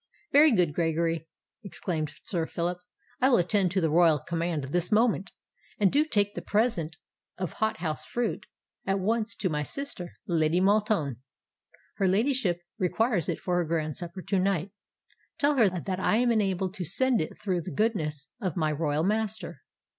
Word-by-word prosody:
"Very 300 +2 +7
good, 180 -9 +2
Gregory," 165 0 0 0.4
exclaimed 165 -6 -3
Sir 170 -6 -2
Phillip: 175 +1 -2 0.4
"I 260 - +4
will 245 - +5
attend 185 +1 +2
to 190 - +2
the 160 -2 +1
royal 165 -1 +5
command 165 -2 -2
this 175 +3 0
moment; 210 -4 +2 0.5
and 200 -3 +4
do 285 - +3
you 305 - +4
take 205 -8 +1
the - - -5
present 190 -8 0 0.4
of 185 -3 -3
hot 220 0 0
house 155 -3 -2
fruit 225 -3 -2 0.4
at 195 0 +2
once 220 +3 0
to 190 - -1
my 150 -4 -1
sister, 180 - -5
Lady 165 0 +2
Maltoun. 200 - +2 0.8
Her 195 - +2
ladyship 205 -3 +1 0.2
requires 195 - +1
it - - -1
for 180 -1 -1
her 175 - +2
grand 155 -2 -1
supper 175 +1 -7
to 195 - 0
night. 190 -1 0 0.7
Tell 290 0 +2
her 220 -5 +6
that 185 +1 -3
I 200 - +2
am 240 0 +3
enabled 190 -4 0
to 195 -3 -4
send 245 - +1
it 155 - -5
through 185 -4 -1
the 170 - -6
goodness 155 -10 -1
of 185 -6 -2
my 155 -2 +1
royal 150 0 0
master." 215 +2 -2
185 Hz, 175 wpm, -28 LUFS, 165-215 Hz, 0.8 s, Very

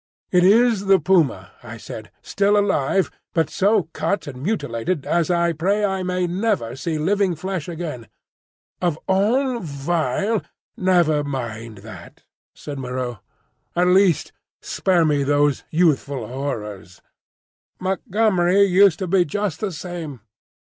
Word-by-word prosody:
"It 180 -1 +4
is 215 0 +4
the 195 0 +6
puma," 150 - +1
I - - -9
said, - - -9
"still 200 +1 +2
alive, 195 -3 +1 0.2
but 160 -2 +1
so 205 0 +2
cut 200 -3 -1
and 130 -3 -8
mutilated 155 - -2
as 170 0 +1
I 170 -1 +2
pray 195 +7 +1
I 190 -1 -1
may 180 0 -1
never 180 - -1
see 155 +4 -3
living 190 +3 +1
flesh 185 +1 -4
again. 155 -9 -6 0.7
Of 175 -4 0
all 235 +7 +2
vile—" 165 - -1 0.3
"Never 175 -5 +2
mind 115 -6 -5
that," 110 - -12 0.3
said 145 -2 -7
Moreau; 125 -3 -4 0.6
"at 180 +1 +3
least, 185 -3 +3 0.3
spare 180 -3 +1
me 145 -2 +2
those 145 0 +1
youthful 145 -7 +1
horrors. 105 -8 -6 0.8
Montgomery 190 0 +2
used 195 -2 +5
to - - -6
be 185 +1 +3
just 180 0 -3
the 210 -3 -2
same. 160 - -7
175 Hz, 130 wpm, -21 LUFS, 145-195 Hz, 0.8 s, the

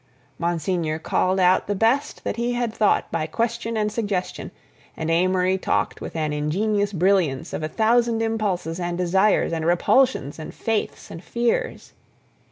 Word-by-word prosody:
Monsignor 170 -1 -1
called 185 +3 0
out 180 0 +3
the 205 - -1
best 230 +8 +1
that - - -2
he 240 +1 0
had 240 -2 -1
thought 210 - +1
by 160 -1 -1
question 230 +4 -2
and 210 0 0
suggestion, 205 -4 -3 0.5
and 160 0 -2
Amory 185 +2 +2
talked - - -1
with - - -7
an 155 -2 -1
ingenious 200 +8 0
brilliance 180 -6 +1
of - - -3
a 155 - -2
thousand 230 +3 +2
impulses 200 -7 -2
and 175 -1 -2
desires 190 +1 +2
and 160 -1 -2
repulsions 175 - +2
and 155 - -8
faiths 225 -2 -3
and 165 - -9
fears. 235 0 -2
190 Hz, 155 wpm, -23 LUFS, 165-225 Hz, 0.5 s, out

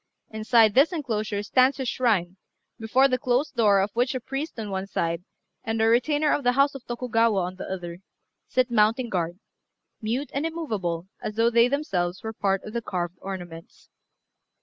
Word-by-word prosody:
Inside 220 0 +4
this 275 - +5
enclosure 220 - -2
stands 255 +5 +3
a 265 - -2
shrine, 210 -8 0 0.4
before 245 +5 +3
the 255 -1 0
closed 250 +5 0
door 210 -4 +4
of 195 +2 0
which 245 +2 0
a - - -1
priest 270 +2 -5
on 210 -2 -5
one 190 0 -3
side, 170 -2 -2 0.4
and 225 0 -2
a 220 - +3
retainer 290 +6 +2
of 290 - -1
the 245 0 +3
house 275 +2 +3
of 270 -3 -9
Tokugawa 230 -3 +1
on 180 +1 -4
the - - -6
other, 175 -2 -6 0.5
sit 255 -1 +1
mounting 230 +2 +2
guard, 175 -2 -2 0.6
mute 240 +6 -2
and 280 - -1
immovable 210 - -3
as 215 - -5
though 230 +1 +3
they 235 +1 +5
themselves 195 - -2
were 220 0 -4
part 195 -2 0
of 215 - -9
the 235 - -2
carved 175 -4 -4
ornaments. 175 -4 -9
225 Hz, 180 wpm, -25 LUFS, 195-255 Hz, 0.6 s, this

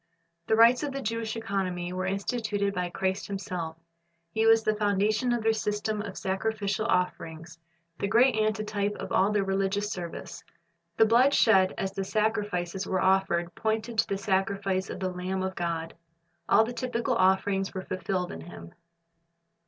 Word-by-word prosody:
The 220 - +3
rites 230 +2 +6
of 290 -2 -3
the 275 - -3
Jewish 230 0 -2
economy 190 -5 -2
were 185 0 -2
instituted 200 0 -1
by 180 -2 -2
Christ 190 +2 -2
Himself 180 -5 -4 0.5
He 220 +4 +1
was 225 0 +6
the 215 0 +2
foundation 210 +3 +1
of 240 -2 0
their 225 0 +3
system 210 0 -2
of 200 -3 -7
sacrificial 210 +2 -1
offerings, 165 -4 -2 0.4
the - - 0
great 240 +4 +4
antitype 215 -1 0
of - - -7
all 195 +2 +3
their 205 -1 +2
religious 195 +2 -1
service. 175 -2 -6 0.5
The 225 - +6
blood 245 +5 +4
shed 190 -4 +4
as 195 - -2
the 195 - -3
sacrifices 200 -3 -1
were 185 - 0
offered 185 -2 +2
pointed 220 +1 -2
to - - +3
the 195 - -1
sacrifice 195 -1 0
of - - -6
the 185 -1 -2
Lamb 185 +1 -3
of 190 0 -2
God. 165 -2 -3 0.6
All 220 - +6
the 235 +2 -4
typical 250 0 -1
offerings 195 -1 +2
were 190 - -4
fulfilled 185 0 -2
in 80 - -7
Him. 85 0 -11
200 Hz, 165 wpm, -28 LUFS, 185-220 Hz, 0.6 s, rites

